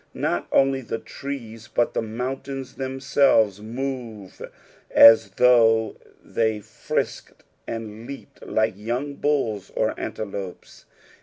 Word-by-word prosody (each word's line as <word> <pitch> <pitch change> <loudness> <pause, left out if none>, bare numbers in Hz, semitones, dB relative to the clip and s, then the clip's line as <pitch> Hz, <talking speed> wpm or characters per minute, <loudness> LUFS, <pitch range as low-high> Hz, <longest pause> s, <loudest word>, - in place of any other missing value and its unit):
Not 85 - -1
only 135 0 +3
the 115 -2 -4
trees, 115 -4 -8
but 120 - 0
the - - 0
mountains 130 +4 -5
themselves 130 -6 +2
move 115 -3 -6 0.5
as 115 -1 +8
though 115 -3 +4 0.3
they 110 -2 0
frisked 110 +1 -4 0.2
and 115 0 -6
leaped 140 - -10
like 110 0 0
young 120 +8 -3
bulls 135 -9 -1
or - - +1
antelopes. 100 -3 -7
115 Hz, 105 wpm, -24 LUFS, 110-135 Hz, 0.5 s, as